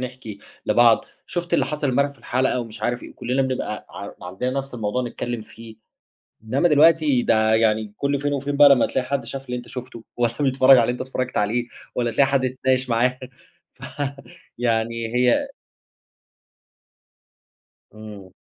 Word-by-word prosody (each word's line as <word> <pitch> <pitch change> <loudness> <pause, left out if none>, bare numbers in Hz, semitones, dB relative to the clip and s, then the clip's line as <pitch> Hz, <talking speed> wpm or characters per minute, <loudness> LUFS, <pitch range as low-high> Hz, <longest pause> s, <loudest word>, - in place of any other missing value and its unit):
نحكِي 125 -5 -7 0.3
لبعض، 115 +1 +4 0.2
شوفت 175 0 -3
اللي - - +3
حصَل 150 -2 -2
إمبارح 140 +2 +1
في 140 - -19
الحلقة 125 0 0
ومش 115 -2 -9
عارف 120 0 -1
إيه، - - -10
وكُلّنا 125 +2 -1
بنبقى 130 -5 -3
ع 100 - -8 0.2
عندنا 95 +8 -3
نفْس 135 -1 -6
الموضوع 115 +2 -2
نتكلّم 120 -1 -4
فيه. 110 0 -13 0.7
إنما 135 +9 +2
دلوقتي 150 -3 +4
ده 110 -1 +3
يعني 110 -1 +1
كل 140 0 0
فين 145 0 -1
وفين 140 +1 -2
بقى 145 0 +8
لمّا 135 -3 +5
تلاقي 130 -1 -2
حد 135 -2 -2
شاف 135 +3 -7
اللي 125 0 -3
أنت 120 - -8
شوفته، 125 -3 -8
والَّا 120 -1 0
بيتفرّج 135 -1 +3
على 120 - +5
اللي 120 - 0
أنت 125 - -8
اتفرّجت 130 -1 -4
عليه، 115 +4 0 0.3
والَّا 120 -1 0
تلاقي 135 +3 +3
حد 140 -1 +2
تتناقش 130 0 0
معاه. 125 +2 +1 0.6
ف 130 - -22 0.7
فيعني 115 0 -1
هي 125 -1 +2 2.4
امم. 105 -3 -11
125 Hz, 160 wpm, -22 LUFS, 115-135 Hz, 2.4 s, بقى